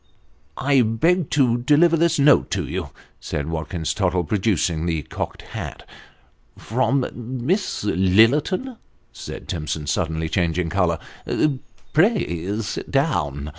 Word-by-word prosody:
" 75 +1 -38 0.2
I 135 - +6
beg 140 +10 +1
to 125 -5 +2
deliver 150 +7 +4
this 165 0 +2
note 145 +1 +5
to - - -2
you," - - -4 0.3
said 75 +2 -4
Watkins 80 0 -3
Tottle, 90 -3 0
producing 85 -3 0
the 80 -3 -1
cocked - - -6
hat. - - -7 0.4
" - - -35 0.3
From 130 +3 0
Miss 125 - -2
Lillerton! 115 - +2 0.2
" - - -40
said - - -8
Timson, 75 -2 -3
suddenly 80 +2 -1
changing 85 -1 0
colour. 90 -4 +1 0.5
" 135 -3 -9
Pray 105 - +1
sit 105 - -5
down." 75 - 0
Mr. 75 - -6
105 Hz, 135 wpm, -22 LUFS, -, 0.5 s, I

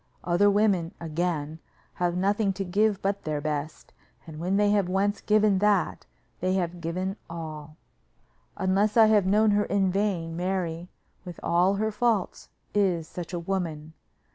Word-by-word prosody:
Other 180 +4 +3
women, 200 -5 +1
again, 160 -2 -3 0.3
have 175 0 -1
nothing 200 +2 +1
to 195 +1 -4
give 205 +2 +1
but 200 +1 -1
their 155 -1 -2
best, 150 0 -4 0.3
and 155 -2 -9
when 185 +4 0
they 205 0 +3
have 200 -3 +2
once 200 +2 0
given 210 -2 +3
that, 205 -4 +1 0.3
they 185 +1 0
have 175 -2 -2
given 185 +4 -3
all. 155 -2 -8 0.8
Unless 200 +3 +1
I 225 - +8
have 210 -3 +3
known 210 +2 +4
her 205 0 +2
in 195 -2 +1
vain, 180 -5 -1
Mary, 175 -1 -3 0.3
with 180 -3 -9
all 180 +3 +3
her 220 +2 -1
faults, 215 -2 -1 0.2
is 180 -6 +1
such 175 +1 -7
a 175 - -3
woman. 165 -4 -4
185 Hz, 155 wpm, -26 LUFS, 170-205 Hz, 0.8 s, I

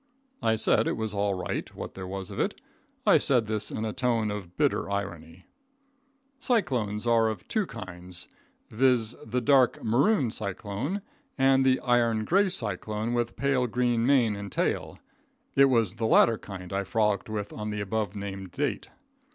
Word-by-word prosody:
I 110 - +2
said 110 +1 +3
it - - -1
was 110 -1 -3
all 100 -1 0
right, 90 - -4
what - - -7
there 95 -1 -7
was 95 0 -6
of - - -6
it. - - -1 0.5
I - - +6
said 125 -5 +3
this 105 -1 -2
in 110 - -3
a 110 - -3
tone 115 -4 0
of 95 -4 -7
bitter - - +1
irony. 90 -3 -5 0.9
Cyclones 125 - 0
are 115 -1 +4
of 110 - -6
two 215 -4 0
kinds, 90 -5 -6 0.4
viz: 120 -1 +2
the 120 +3 -2
dark 130 -1 +3
maroon 130 - +2
cyclone; 110 - -4 0.3
and 135 0 +4
the 130 -1 +3
iron 115 -3 +2
gray 195 - +3
cyclone 110 - -2
with 120 -1 -1
pale 135 -3 +1
green 120 0 +1
mane 120 -5 +3
and 100 -1 -7
tail. - - -1 0.6
It 140 - +7
was 115 -8 +2
the 115 +1 -2
latter 115 0 +5
kind 95 -2 -8
I 100 0 0
frolicked 105 0 0
with 105 -1 -4
on 105 0 -5
the 105 0 -3
above 100 0 -2
named 95 -2 -6
date. - - -2
110 Hz, 165 wpm, -27 LUFS, 100-125 Hz, 0.9 s, It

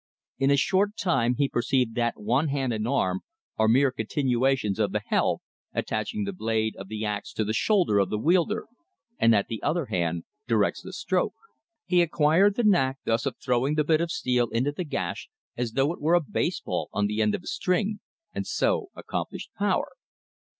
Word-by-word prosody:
In 135 0 +3
a 140 - +4
short 195 +7 +1
time 125 -10 +1
he 140 -1 +2
perceived 125 -1 0
that 120 0 -1
one 125 +9 +1
hand 135 -4 -1
and 110 0 -2
arm 95 -8 +1 0.4
are 110 - +4
mere 130 +4 +4
continuations 125 -2 0
of 105 -3 +1
the 105 - 0
helve, - - +1 0.3
attaching 110 - -2
the 200 0 -3
blade 110 -8 -1
of 95 - -8
the 110 +1 -4
ax 105 -1 -3
to 110 - 0
the 110 - -1
shoulder 175 - +3
of 95 -2 +2
the 105 - -1
wielder; 180 - +2 0.5
and 115 - +5
that 100 -3 +3
the 115 - -5
other 155 +1 0
hand 85 -6 -1 0.2
directs - - +1
the - - -9
stroke. - - -1 0.5
He 180 -1 +4
acquired 170 +5 +3
the 240 - 0
knack 135 -11 +3
thus 115 +4 +1
of 130 - -2
throwing 125 +4 0
the 155 - +2
bit 155 +1 +2
of 170 - -1
steel 125 -5 0
into 125 +5 0
the 175 +5 -4
gash 120 - -4 0.3
as 120 -2 -3
though 135 +5 +2
it - - -12
were 160 +4 +3
a - - +6
baseball 155 - -2
on 105 - 0
the 105 +1 -1
end 105 -1 +2
of - - -7
a - - -16
string; 205 +3 0 0.3
and - - -4
so 465 -5 +1
accomplished - - -5
power. - - 0
130 Hz, 195 wpm, -26 LUFS, 110-165 Hz, 0.5 s, a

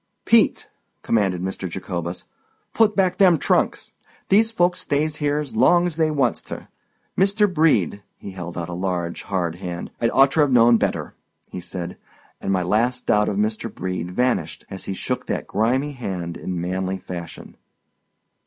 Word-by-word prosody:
"Pete!" - - +3 0.4
commanded 95 -5 +1
Mr. 95 -1 -3
Jacobus, 85 -1 -5 0.5
"put 220 -2 +3
back 185 -1 +1
them 180 -4 +6
trunks. - - 0 0.4
These 220 +3 +4
folks 180 -4 +1
stays 150 +2 -1
here's 145 -2 -1
long's 175 +8 +4
they 160 -1 +2
wants 140 -6 +1
ter. - - -9 0.5
Mr. 200 +2 +3
Brede"—he 110 - 0
held 90 -2 -7
out 85 -2 -3
a 90 - -6
large, 90 -2 -2
hard 90 -4 -2
hand—"I'd 90 +5 -3
orter've 135 +2 +4
known 120 -1 +6
better," - - -2 0.4
he 90 - -6
said. 90 0 -6 0.4
And 95 - -2
my 95 -2 +1
last 120 +7 0
doubt 105 0 +3
of 100 - -2
Mr. 110 +1 -1
Brede 90 -2 -4
vanished 90 -6 -1
as 95 - -6
he 95 - -3
shook - - -3
that - - -2
grimy 125 +8 0
hand 90 -10 -5
in 90 -2 -4
manly 95 +2 -2
fashion. 85 -3 -8
105 Hz, 150 wpm, -22 LUFS, 90-145 Hz, 0.5 s, them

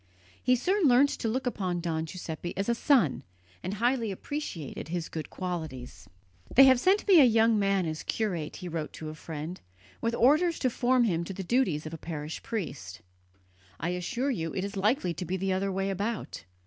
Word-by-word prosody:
He 250 +1 +4
soon 365 - +2
learnt 265 +3 +6
to - - -3
look 255 +4 -1
upon 185 -7 -1
Don 165 -2 -2
Giuseppe 175 0 -6
as 195 - -1
a 235 - +3
son, 235 - +3 0.4
and 190 +3 -3
highly 235 +1 +1
appreciated 195 - -5
his 170 0 -3
good 160 -1 -5
qualities. 160 -9 -6 0.5
"They 270 - +10
have 260 -2 +7
sent 385 +9 +2
me 375 -4 +8
a - - +9
young 225 -2 +4
man 195 -2 +2
as 155 -1 -3
curate," 180 -9 -2
he 180 - -7
wrote 165 -3 -4
to 155 - -7
a - - -6
friend, 155 +2 -7 0.4
"with 230 +1 0
orders 310 +9 +4
to 255 - 0
form 250 +1 +3
him 170 -7 +1
to 195 - -6
the 190 +1 -5
duties 180 - +1
of 155 - -6
a 160 - -6
parish 155 -1 -5
priest. 125 - -5 0.8
I 170 - -1
assure 240 +10 -1
you 165 -9 -3
it 190 - -1
is 200 +1 -6
likely 205 - +1
to 165 - -5
be 180 +2 -2
the 190 0 0
other 195 +1 0
way 195 +1 -1
about. 205 +4 -4
195 Hz, 200 wpm, -29 LUFS, 165-245 Hz, 0.8 s, They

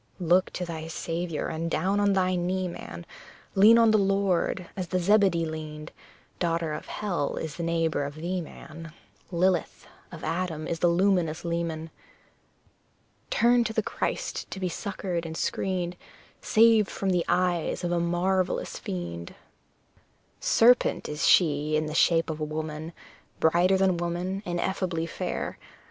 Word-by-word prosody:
Look 180 +1 +3
to 180 - -3
thy 160 -2 -6
Saviour, 165 0 -3
and 165 +1 -3
down 190 +6 +1
on 205 -1 +3
thy 185 -1 +2
knee, 185 +1 -1
man, 85 - -8 0.5
Lean 210 +4 +7
on 230 -1 +5
the 215 - +4
Lord, 195 -2 +1
as 185 -2 -4
the 185 - -1
Zebedee 185 -2 +3
leaned; 155 0 -7 0.5
Daughter 165 -2 0
of 150 - -6
hell 180 -9 -2
is 160 -1 -5
the 170 - -5
neighbour 165 -3 0
of 140 +1 -5
thee, 175 +3 -3
man 165 0 -10 0.4
Lilith, 180 0 0 0.3
of 165 -2 -10
Adam 165 -1 -2
the 170 +2 +1
luminous 175 -2 +1
leman! 165 -1 -3 1.4
Turn 240 +1 +4
to 220 -1 -3
the 220 - 0
Christ - - -3
to - - -6
be 185 -1 -1
succoured 185 -2 -3
and 160 -1 -6
screened, 180 -2 -2 0.5
Saved 220 -2 +4
from 195 -1 -1
the 175 -2 +2
eyes 180 -1 0
of 175 - -1
a 175 - +1
marvellous 180 +2 0
fiend! 85 -2 -6 1.0
Serpent 245 +2 +4
she 150 -1 +3
is - - +4
in 155 - 0
the 155 - -5
shape 165 0 +3
of 155 - -6
a - - -2
woman, 155 +1 -4 0.5
Brighter 175 +4 +4
than 190 -2 +2
woman, 175 +3 -2
ineffably 175 -1 -1
fair! 165 - -4
175 Hz, 150 wpm, -27 LUFS, 160-190 Hz, 1.4 s, Lean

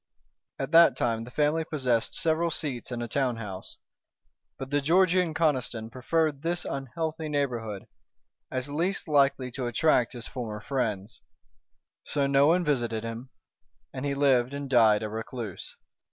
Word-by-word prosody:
At 135 +2 -4
that 170 +1 +7
time 115 -1 -1
the - - -10
family 150 +4 +1
possessed 130 -8 -1
several 165 0 +1
seats 140 -6 -4
and 120 -1 -3
a - - -4
town 130 -1 0
house. 100 -4 -8 0.8
But 135 +1 -7
the 145 0 +2
Georgian 180 +1 +3
Conniston 125 -8 0
preferred 150 +3 0
this 175 +2 -2
unhealthy 155 +4 -4
neighborhood, 120 -8 -2 0.6
as 130 +1 -3
least 170 +8 -1
likely 140 -4 +2
to 125 0 -3
attract 120 -1 +2
his 120 -1 -6
former 110 -4 -5
friends. 110 -3 -3 0.8
So 145 -2 0
no 140 +1 +4
one 175 +2 +3
visited 120 -6 0
him, 115 +3 -6 0.6
and 130 - -5
he 140 -1 -1
lived 135 -2 +2
and 140 0 -5
died 110 -5 +4
a - - -2
recluse. 110 -1 -6
135 Hz, 150 wpm, -27 LUFS, 120-155 Hz, 0.8 s, that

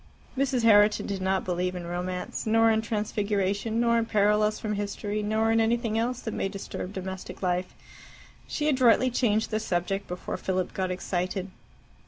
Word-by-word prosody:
Mrs. 260 -3 0
Herriton 210 -1 +5
did 195 -2 -3
not 190 0 0
believe 180 0 -1
in 175 -1 -5
romance 180 +3 -4
nor 225 +1 +5
in 220 0 +2
transfiguration, 210 0 -1
nor 235 0 +3
in 225 - -1
parallels 210 0 +2
from 215 -1 -2
history, 205 +1 -3
nor 220 +2 +1
in 225 - +3
anything 230 0 +1
else 240 +2 -1
that 220 - -4
may 195 - -1
disturb 195 -1 -6
domestic 190 0 -7
life. 180 0 -1 0.7
She 300 - -2
adroitly 255 -2 +4
changed 220 -3 +1
the 215 - +1
subject 195 0 -2
before 180 0 -5
Philip 185 -1 -2
got 190 -1 -1
excited. 185 +1 -3
210 Hz, 165 wpm, -27 LUFS, 185-225 Hz, 0.7 s, Herriton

